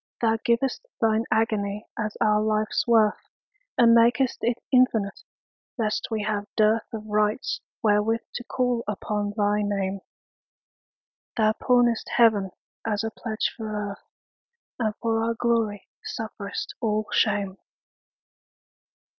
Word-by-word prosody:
Thou 225 -1 +2
giv'st 235 - 0
Thine 225 0 +2
agony 210 -2 0
as 215 -1 -3
our 210 0 +3
life's 215 +1 0
worth, 220 -3 +4 0.6
And 230 -1 +6
mak'st 235 +2 +4
it 235 0 +1
infinite, 230 -6 +3 0.6
lest 215 -3 -1
we 220 -2 -2
have 205 -1 -2
dearthOf 215 0 +1
rights 210 +3 0 0.2
wherewith 215 +2 +2
to 245 - -5
call 245 -2 0
upon 205 0 -2
thy 205 0 +2
Name; 200 -1 -1 1.4
Thou 215 -1 +4
pawnest 240 -1 +2
Heaven 215 -5 +4 0.3
as 210 -1 -1
a 225 - -2
pledge 220 0 -2
for 210 -3 -4
Earth, 200 - -13 0.7
And 215 -3 0
for 225 -1 +1
our 230 0 0
glory 225 -4 0 0.2
sufferest 205 -2 -5
all 215 -1 0
shame. 200 -3 +1
215 Hz, 120 wpm, -25 LUFS, 210-230 Hz, 1.4 s, And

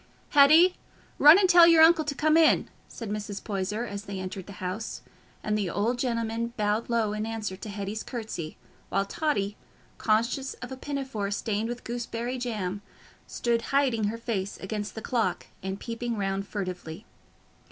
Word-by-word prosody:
"Hetty, 310 +6 +6 0.4
run 300 +4 +10
and 395 -2 +4
tell 350 -2 +8
your 330 -1 +7
uncle 325 0 +6
to 285 -1 -2
come 310 +2 +3
in," 325 -1 +4 0.2
said 225 -4 -7
Mrs. 205 -1 -4
Poyser, 210 +3 -2
as 205 -2 -6
they 200 -2 -5
entered 185 0 -6
the 200 - -9
house, 185 +4 -5 0.4
and 210 - 0
the 205 -4 -1
old 230 +7 0
gentleman 230 -1 -1
bowed 210 +2 0
low 225 -3 +1
in 215 0 -2
answer 220 -3 -4
to 210 - -8
Hetty's 200 +1 -4
curtsy; 215 - -6 0.3
while 195 - +1
Totty, 205 -6 -1 0.4
conscious 235 +5 0
of 250 - -9
a - - -4
pinafore 265 -7 -4
stained 210 +2 -2
with 240 0 -5
gooseberry 240 +1 -4
jam, 205 -5 -3 0.5
stood 235 -1 0
hiding 265 -6 +2
her 215 +3 -2
face 210 -4 -3
against 210 +2 -5
the 220 - -6
clock 235 -4 -1 0.2
and 190 +1 -4
peeping 235 -1 -4
round 195 0 -2
furtively. 180 -6 -5
225 Hz, 165 wpm, -27 LUFS, 200-250 Hz, 0.5 s, run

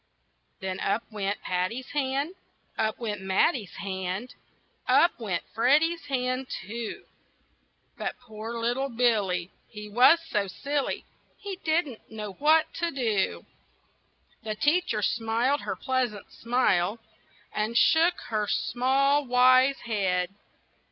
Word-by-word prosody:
Then 190 0 -3
up 200 +4 0
went 205 -1 -3
Patty's 185 +8 -2
hand, 280 +3 -1 0.4
Up 220 0 0
went 210 -4 -4
Matty's 195 - +1
hand, 190 +5 -4 0.5
Up 340 - +4
went 190 -7 -2
Freddy's 300 +8 +3
hand, 255 -1 -1
too; 225 +3 -6 0.9
But - - -3
poor 225 -1 -7
little 245 +4 0
Billy, 210 -7 +1 0.2
He 210 -1 -9
was 250 +10 +6
so 205 -9 0
silly, 280 +8 -2 0.3
He 400 -2 -6
didn't 315 - -1
know 210 -2 -5
what 310 +6 +3
to 340 0 0
do. 225 -9 -1 1.0
The 215 -2 -4
teacher 295 - +1
smiled 235 +6 +1
her - - -3
pleasant 255 -6 -2
smile, 230 -5 +1 0.6
And 215 +2 -1
shook 335 +6 +4
her 215 -2 0
small, 275 +6 +2
wise 255 +2 +5
head. 190 -5 0
235 Hz, 115 wpm, -27 LUFS, 210-275 Hz, 1.0 s, was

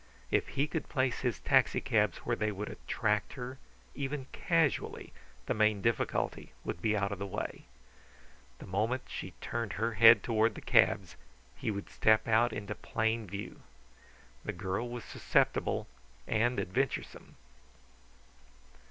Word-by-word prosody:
If - - +2
he 140 - +4
could 155 +1 -4
place 130 -3 0
his 125 -4 -1
taxicabs - - +2
where - - +1
they 105 0 0
would 105 +1 -5
attract 105 -2 -1
her, 130 0 -7 0.3
even 140 -1 -3
casually, 165 -5 0 0.3
the - - 0
main 110 -1 +3
difficulty 115 -1 -1
would 85 - -4
be 105 0 +2
out 100 0 0
of 100 - -4
the 100 - -3
way. 95 - -5 0.9
The - - -10
moment 110 +7 -1
she - - -6
turned 115 -3 -3
her 115 +3 -1
head 115 0 +8
toward 110 -1 +2
the - - -6
cabs - - +3 0.4
he - - -3
would 100 -2 -3
step 110 +1 +3
out 115 +1 +4
into 105 -1 -4
plain 110 0 -1
view. 100 +3 -7 0.8
The - - -3
girl 95 +6 -3
was 120 -1 -6
susceptible - - +1 0.4
and 120 +3 +1
adventuresome. 130 +9 -2
110 Hz, 140 wpm, -32 LUFS, 105-125 Hz, 0.9 s, head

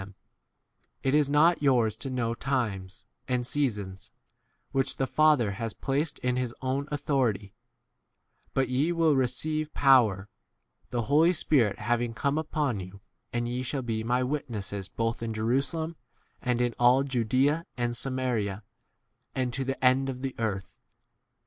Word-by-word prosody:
7 95 - -7
them, 95 - -18 0.9
It 135 - +1
is 150 -2 +4
not 155 +4 +4
yours 120 -7 +3
to 135 - -3
know 120 -3 -1
times 115 -6 -3 0.2
and 125 -2 0
seasons, 105 -9 -2 0.6
which 135 -1 0
the 135 - +1
Father 150 -7 +3
has 115 +2 -4
placed 140 +3 -1
in 125 0 -1
his 125 -2 -2
own 135 +2 -1
8 - - -3
authority; 135 -8 +1
c - - -38 1.0
but 135 -1 +2
ye 135 +7 +1
will 165 -3 +3
receive 150 +5 0
d - - -35
power, 115 -8 +4 0.6
the 120 -1 -1
Holy 155 +8 +4
Spirit 130 - +2
having 120 +1 -1
come 140 +5 0
upon 150 -7 -1
you, 95 +1 -9 0.3
and 120 0 -1
ye 125 +1 -2
shall 130 +1 -3
be 110 -2 -2
my 125 +2 +1
e - - +1
witnesses 105 -8 -4
both 115 0 -2
in 115 -1 -3
Jerusalem 140 +9 -1 0.5
and 125 -1 0
in 120 -1 +1
all 125 +3 +5
Judaea 135 +5 +1
and 120 -1 -1
Samaria, 120 -6 -2 0.7
9 130 - +1
and 125 -1 -3
to 135 - -1
the 135 0 -2
end 130 +1 +4
of 130 0 -6
the 135 -1 -2
earth. 100 -4 -3
125 Hz, 165 wpm, -28 LUFS, 115-140 Hz, 1.0 s, all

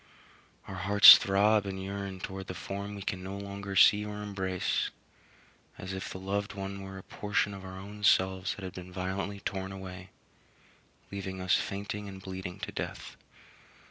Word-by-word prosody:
Our 95 - -7
hearts 100 +2 +10
throb 100 +1 +3
and 95 -1 -4
yearn 95 -1 -5
towards 95 0 -6
the 90 - -5
form 100 +2 -5
we 100 - -7
can 95 -1 -3
no 95 +1 -6
longer 100 0 -6
see 105 +2 +7
or 105 0 -5
embrace, 95 -3 -1 0.9
as 95 +1 -6
if 95 - -5
the - - -6
loved 100 +1 -2
one 100 0 -5
were 95 0 -8
a 95 - -9
portion 105 -1 -1
of 95 -1 -9
our 95 0 -8
own 105 +2 -9
selves 95 0 +3
that 100 - -10
had 95 - -6
been 90 0 -9
violently 95 +2 -3
torn 95 0 -3
away, 95 -1 -8 1.0
leaving 95 -1 -5
us 95 -1 +1
fainting 100 +1 -2
and 95 -1 -9
bleeding 95 0 -7
to - - -4
death. - - -6
95 Hz, 175 wpm, -30 LUFS, 95-100 Hz, 1.0 s, hearts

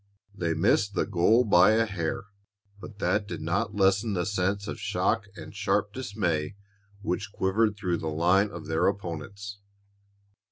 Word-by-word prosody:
They 85 -5 -1
missed 100 +3 +2
the - - +1
goal 110 +8 +3
by 100 0 +6
a 115 +1 +3
hair, 90 -5 -3 0.6
but 105 0 -11
that 100 +2 0
did 85 - -5
not 100 +7 -1
lessen 100 +2 +2
the 90 -1 0
sense 100 0 -1
of - - -5
shock 100 +2 0
and 105 - -10
sharp 105 -1 0
dismay 100 -9 -2 0.5
which 100 +1 -2
quivered 105 +3 +1
through 90 -4 -1
the 80 - -5
line 90 +6 +3
of 85 -4 -8
their 80 0 +1
opponents. 100 +2 -4
100 Hz, 155 wpm, -27 LUFS, 90-105 Hz, 0.6 s, by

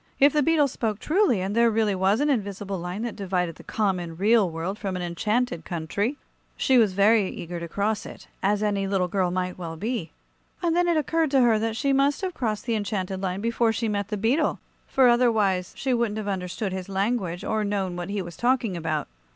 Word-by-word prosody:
If 280 +1 +6
the 300 - +3
beetle 300 -1 +3
spoke 225 -5 -2
truly, 310 - +2
and 195 +3 -2
there 235 0 +5
really 220 -2 +1
was 195 +5 +2
an 295 - +2
invisible 200 -5 -2
line 180 +5 -4
that 235 - -4
divided 180 -4 -2
the - - -13
common, 180 -6 -1
real 210 0 +4
world 170 +5 -4
from 195 -3 -3
an 180 - -3
enchanted 210 +2 -1
country, 195 - -2 0.4
she 260 -2 +4
was 210 -5 +3
very 200 +1 +4
eager 170 0 -6
to 170 - -5
cross 205 +5 -1
it, - - -12
as 205 +2 +1
any 200 -2 0
little 190 -2 +1
girl 185 0 0
might 180 0 -3
well 165 -2 -5
be. 215 -2 -3 0.5
And 335 -1 +2
then 350 0 +3
it 340 -2 +3
occurred 320 +1 +1
to 270 -1 +4
her 230 -3 +4
that 225 0 -1
she 275 +3 +1
must 275 +3 +2
have 375 -2 -2
crossed 220 -7 -2
the 235 - 0
enchanted 195 -3 -2
line 190 0 -2
before 230 0 +1
she 225 +1 -2
met 205 -2 -1
the 210 - -3
beetle, 255 +10 +1 0.3
for 265 -2 +4
otherwise 220 -7 +2
she 265 -2 0
wouldn't 235 -3 0
have 215 -1 -4
understood 190 +1 -3
his 190 0 -5
language, 195 -3 -1
or 220 -1 0
known 195 -3 -1
what 175 +1 -5
he 200 -1 -2
was 170 -1 -9
talking 240 -5 +1
about. 155 -3 -2
205 Hz, 215 wpm, -25 LUFS, 185-235 Hz, 0.5 s, If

